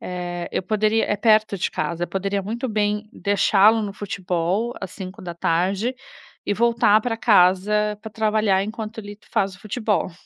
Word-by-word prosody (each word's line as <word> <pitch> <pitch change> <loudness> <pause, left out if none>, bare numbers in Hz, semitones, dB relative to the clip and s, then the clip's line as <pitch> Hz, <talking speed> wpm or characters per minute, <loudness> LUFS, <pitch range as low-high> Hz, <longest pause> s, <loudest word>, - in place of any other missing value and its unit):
eh, 175 -1 -5
eu - - -1
poderia 215 +2 +1
é 210 - 0
perto 215 -1 +3
de - - -1
casa, 170 0 -2
eu - - -10
poderia 195 +1 -2
muito 235 +6 -4
bem 210 0 -1
deixá-lo 205 +2 +3
no 205 -1 -4
futebol 195 +2 -2
às 190 -2 -6
17h, 185 +3 -2 0.5
e - - +1
voltar 230 -1 +3
pra 225 0 -2
casa 210 0 +3
pra 220 - -8
trabalhar 215 -3 +1
enquanto 220 +1 -6
ele 205 -1 -8
faz 195 -1 0
o - - -22
futebol. 215 -2 -1
205 Hz, 160 wpm, -22 LUFS, 190-220 Hz, 0.5 s, perto